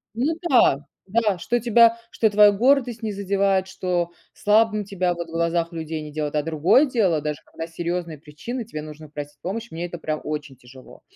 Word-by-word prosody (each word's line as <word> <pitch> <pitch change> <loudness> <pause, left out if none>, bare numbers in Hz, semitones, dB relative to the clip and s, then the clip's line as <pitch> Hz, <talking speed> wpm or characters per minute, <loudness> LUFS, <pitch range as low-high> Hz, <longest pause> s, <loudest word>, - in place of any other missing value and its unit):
Ну 275 +7 +1 0.2
да, 145 - +4 0.2
да, 210 -2 +1
что 240 +6 0
тебя 230 0 +5
что 225 - +2
твоя 205 0 +7
гордость 245 +1 +2
не 215 - -1
задевает, 195 -1 +1
что 180 -2 -1 0.2
слабым 215 0 +2
тебя 185 -3 0
вот 170 0 -6
в - - -12
глазах 170 +1 0
людей 160 -1 -5
не 150 - -8
делает. 150 -1 -3
А 150 - +2
другое 165 - +4
дело, 190 - +1
даже 150 0 -3
когда 165 0 -7
серьёзные 170 -1 -4
причины, 170 - -7
тебе 155 -9 -6
нужно 155 0 -10
просить 145 0 -8
помощь, 225 +6 -4
мне 170 +2 -4
это, 175 -1 -7
прям, 155 -1 -3
очень 150 -2 -5
тяжело. 130 +1 -15
175 Hz, 190 wpm, -23 LUFS, 155-215 Hz, 0.2 s, твоя